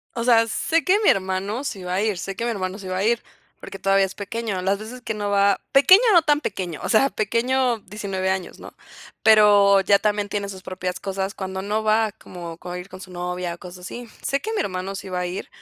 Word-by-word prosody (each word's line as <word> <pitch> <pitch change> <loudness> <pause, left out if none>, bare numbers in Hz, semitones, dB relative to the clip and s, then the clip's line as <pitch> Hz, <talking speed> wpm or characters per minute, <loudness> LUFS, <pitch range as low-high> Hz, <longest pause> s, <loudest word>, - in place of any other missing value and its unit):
O 235 - -2
sea, 230 -2 +5
sé 325 +9 +1
que 380 +2 +4
mi 430 - +3
hermano 195 +5 0
sí 205 -9 -4
va 180 0 -3
a 190 - +1
ir. 210 -4 0
Sé 195 +2 -5
que 230 - -4
mi 240 - 0
hermano 190 -3 -3
sí 190 - -8
va 185 - -2
a 195 - 0
ir, 235 +2 +2 0.4
porque 195 - -9
todavía 195 0 +3
es 190 - -5
pequeño. 210 -1 -3
Las 195 +2 0
veces 245 +4 -9
que 230 -2 -3
no 205 -1 -3
va 200 0 +3
Pequeño, 370 +9 +7
no 345 -3 +6
tan 295 -1 +2
pequeño, 185 - -4
o - - -3
sea, 270 +5 +4
pequeño, 240 +3 0
19 195 -2 -4
años, 190 -1 -3
¿no? - - -11 0.5
Pero 205 -2 +6
ya 200 +1 +4
también 205 -1 0
tiene 200 -1 -3
sus 190 -1 -8
propias 185 -1 -4
cosas. 195 0 -3
Cuando 190 0 -5
no 210 +2 -1
va, 215 0 +3
como, 175 -5 -10
con 180 0 -7
ir 180 +1 -8
con 185 -2 -11
su 185 -1 -11
novia, 180 0 -4
cosas 180 +1 -11
así. 240 +3 -8
Sé 275 +1 -1
que 440 - -4
mi 430 - 0
hermano 190 - -3
sí 195 - -7
va 180 -1 -2
a 180 - -1
ir 180 +2 -5
200 Hz, 240 wpm, -23 LUFS, 185-225 Hz, 0.5 s, Pequeño